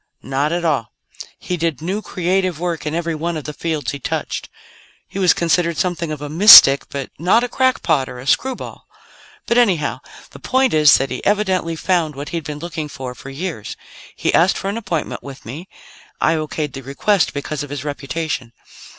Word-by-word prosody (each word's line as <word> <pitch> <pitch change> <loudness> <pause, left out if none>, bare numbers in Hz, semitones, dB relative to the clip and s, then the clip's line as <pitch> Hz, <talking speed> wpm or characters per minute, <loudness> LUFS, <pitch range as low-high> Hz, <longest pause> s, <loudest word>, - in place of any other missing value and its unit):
"Not 135 +3 -1
at 175 0 -1
all. 140 -8 -1 0.4
He 180 - -4
did 165 -4 -1
new, 190 +6 -3
creative 185 -3 -1
work 170 -3 -3
in 150 - -2
every 170 -1 -2
one 165 +2 -3
of 155 - -6
the 150 - -6
fields 155 -5 -3
he 140 - -6
touched. - - -4 0.6
He 195 - -7
was 185 -3 +5
considered 170 -1 +1
something 170 -3 -1
of 150 -1 -6
a - - -4
mystic, 155 -4 +9
but 140 -2 -6
not 190 +8 +3
a - - 0
crackpot, 210 - +1
or 125 - -8
a 125 - -9
screwball. 260 - -2 0.6
"But, 235 - +2
anyhow, 180 -11 +1 0.3
the - - -12
point 260 0 +1
is 150 -2 +6
that 135 0 -3
he - - -5
evidently 190 -5 0
found 165 -3 0
what 140 +2 -6
he'd 165 -3 -4
been 150 0 -5
looking 160 -1 -5
for 130 -2 -7
for 135 - -11
years. 145 - -6 0.4
He - - -1
asked 180 +3 +4
for 195 - -3
an 205 - -3
appointment 190 -8 -3
with 140 -1 -11
me; 155 +11 -8 0.5
I 160 - +2
okayed 155 -2 -3
the 135 - -7
request 150 +9 +1
because 145 +1 -4
of 145 - -6
his 145 0 -5
reputation. 145 -3 -4
160 Hz, 195 wpm, -19 LUFS, 145-180 Hz, 0.6 s, mystic